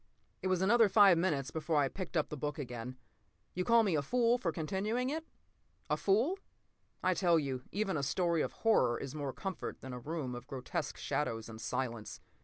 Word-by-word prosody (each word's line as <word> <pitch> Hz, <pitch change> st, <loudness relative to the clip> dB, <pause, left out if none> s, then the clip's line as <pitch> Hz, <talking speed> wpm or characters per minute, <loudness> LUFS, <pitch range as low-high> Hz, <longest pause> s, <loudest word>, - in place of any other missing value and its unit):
p> -, -, -41 dB
It -, -, -1 dB
was 185 Hz, 0 st, +1 dB
another 225 Hz, +2 st, +5 dB
five 200 Hz, -3 st, +7 dB
minutes 155 Hz, -6 st, 0 dB
before 160 Hz, 0 st, -2 dB
I 145 Hz, -2 st, +4 dB
picked 180 Hz, +3 st, -4 dB
up 155 Hz, -, +1 dB
the -, -, -4 dB
book 150 Hz, +1 st, -3 dB
again. 125 Hz, -2 st, -6 dB, 0.6 s
You 180 Hz, -, -1 dB
call 230 Hz, +3 st, +5 dB
me 195 Hz, -5 st, +1 dB
a 150 Hz, -, +2 dB
fool 240 Hz, -, +2 dB
for 175 Hz, -7 st, 0 dB
continuing 205 Hz, -, -1 dB
it? 320 Hz, +2 st, -4 dB, 0.6 s
A -, -, +4 dB
fool? 240 Hz, -, +2 dB, 0.6 s
I -, -, +3 dB
tell 175 Hz, -3 st, +3 dB
you, 135 Hz, -4 st, -2 dB
even 200 Hz, -3 st, -1 dB
a -, -, -1 dB
story 170 Hz, +4 st, +1 dB
of -, -, -1 dB
horror 125 Hz, -, +4 dB
is 135 Hz, -1 st, -6 dB
more 145 Hz, -3 st, -3 dB
comfort 190 Hz, +6 st, -5 dB
than 130 Hz, -1 st, -7 dB
a 125 Hz, -, -5 dB
room 145 Hz, -1 st, -4 dB
of 120 Hz, 0 st, -8 dB
grotesque 130 Hz, -2 st, -4 dB
shadows 115 Hz, 0 st, -2 dB
and 110 Hz, 0 st, -9 dB
silence. 115 Hz, -4 st, -3 dB
160 Hz, 205 wpm, -33 LUFS, 130-200 Hz, 0.6 s, five